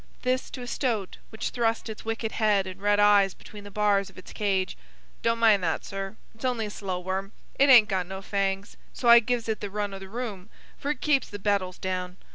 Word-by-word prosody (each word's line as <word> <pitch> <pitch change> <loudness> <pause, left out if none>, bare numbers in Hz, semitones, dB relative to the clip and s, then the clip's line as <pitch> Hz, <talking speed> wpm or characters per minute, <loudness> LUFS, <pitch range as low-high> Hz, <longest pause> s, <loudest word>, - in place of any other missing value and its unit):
This 255 +1 0
to 250 - -7
a - - -7
stoat 230 -7 -2
which 220 - -4
thrust 230 -1 0
its 220 -1 -7
wicked 225 0 -3
head 210 -3 +2
and 185 0 -8
red 205 0 +3
eyes 205 -2 +5
between 210 -1 -12
the 205 - -9
bars 200 -1 +1
of - - -20
its 185 - -11
cage. 195 -3 0 0.5
"Don't 230 0 +1
mind 220 -4 +4
that, 165 -2 -1
sir: 195 +1 -5 0.2
it's 225 - -16
only 245 -4 0
a 210 - -6
slow 190 -3 -4
worm. 190 +2 -4 0.3
It 280 +1 +6
hain't 235 -5 +9
got 185 -3 -1
no 190 +1 -7
fangs, 195 0 -2 0.2
so 240 - 0
I 235 0 +10
gives 235 0 -1
it 220 -1 -1
the 205 - -5
run 205 0 -3
o' 195 - -6
the 190 0 -10
room, 215 -4 -5 0.3
for 285 - -5
it 295 - -2
keeps 290 -3 +2
the 205 - -6
beetles 195 -2 0
down. 185 -1 -4
205 Hz, 230 wpm, -27 LUFS, 195-225 Hz, 0.5 s, I